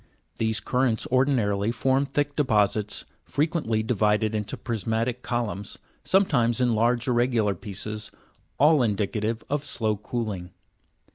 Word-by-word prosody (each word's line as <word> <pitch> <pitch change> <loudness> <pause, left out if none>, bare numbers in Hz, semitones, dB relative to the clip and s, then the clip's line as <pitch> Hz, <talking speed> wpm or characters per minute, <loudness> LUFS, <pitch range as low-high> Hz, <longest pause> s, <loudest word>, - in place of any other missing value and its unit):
These 110 -1 0
currents 125 -3 +1
ordinarily 115 -6 +2
form 135 +3 +1
thick 145 +1 -1
deposits, 105 -6 +1 0.2
frequently 145 -8 0
divided 110 -1 +1
into 105 -1 -3
prismatic 115 +2 -2
columns, 105 -6 -3 0.3
sometimes 125 - +2
in 125 -2 +3
large 120 +3 +2
irregular 120 -4 +2
pieces, 105 +1 -5 0.5
all 150 +1 +6
indicative 110 0 -1
of 145 0 -1
slow 110 -6 -1
cooling. 105 -5 -4
115 Hz, 115 wpm, -26 LUFS, 105-130 Hz, 0.5 s, all